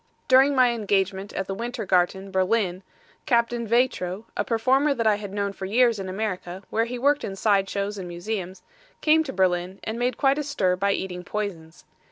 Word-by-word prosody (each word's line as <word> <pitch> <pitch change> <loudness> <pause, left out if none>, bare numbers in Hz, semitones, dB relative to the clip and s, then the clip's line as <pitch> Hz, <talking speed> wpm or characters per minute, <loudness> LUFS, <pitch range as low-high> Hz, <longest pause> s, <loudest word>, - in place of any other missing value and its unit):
During 270 +2 +5
my 255 -2 +5
engagement 200 -3 -1
at 195 - -2
the 195 - -4
Winter 235 +2 -4
Garten, 190 +1 +1
Berlin, 190 -1 +1 0.5
Captain 235 -1 +1
Veitro, 220 -4 0
a - - 0
performer 265 +5 +2
that 230 - -1
I 215 -2 +4
had 205 -2 -7
known 200 0 -2
for 190 -1 -6
years 235 +1 +3
in 190 -1 -5
America, 185 -2 -4
where 225 +1 +1
he 245 +1 -5
worked 285 +4 +2
in 195 - -4
side 195 -1 +2
shows 200 0 -3
and 180 - -6
museums, 185 +1 -5 0.4
came 315 +1 +4
to 285 - -5
Berlin 185 -2 0
and 220 +2 -4
made 245 0 0
quite 275 +1 +2
a - - -1
stir 205 -11 0
by 200 +2 +1
eating 180 -2 -4
poisons. 180 -5 -5
205 Hz, 195 wpm, -25 LUFS, 190-240 Hz, 0.5 s, During